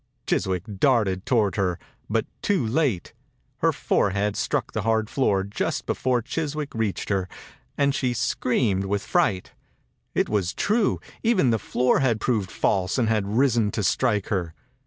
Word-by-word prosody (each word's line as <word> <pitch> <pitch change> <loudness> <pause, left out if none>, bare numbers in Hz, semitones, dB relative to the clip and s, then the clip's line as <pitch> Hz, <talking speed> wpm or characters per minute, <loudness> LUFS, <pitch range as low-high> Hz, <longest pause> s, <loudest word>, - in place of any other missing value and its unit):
Chiswick 90 -2 0 0.2
darted 105 -8 +2
toward 105 -7 +2
her, 90 -3 0 0.3
but - - +1 0.2
too 195 - +1
late. 120 - 0 0.4
Her - - +3
forehead 100 +1 0
struck - - -1
the - - -1
hard 110 -1 0
floor 100 -8 +2
just 100 +2 -3
before 125 -2 0
Chiswick 150 0 -3
reached 110 -3 -2
her, 95 -3 0 0.5
and 140 -1 +2
she 125 -3 0
screamed 110 -4 0
with 100 +1 -1
fright. 95 -2 +1 0.6
It - - +2
was 100 -4 -1
true!, 215 0 +1 0.2
Even 205 - +3
the 110 - +1
floor 125 +5 +1
had 120 -5 +2
proved 105 -5 0
false 95 +2 0
and 115 -3 +2
had 105 -3 +1
risen 120 -5 +3
to 105 - -1
strike 105 0 +1
her. 90 -6 -2
110 Hz, 155 wpm, -24 LUFS, 100-130 Hz, 0.6 s, Her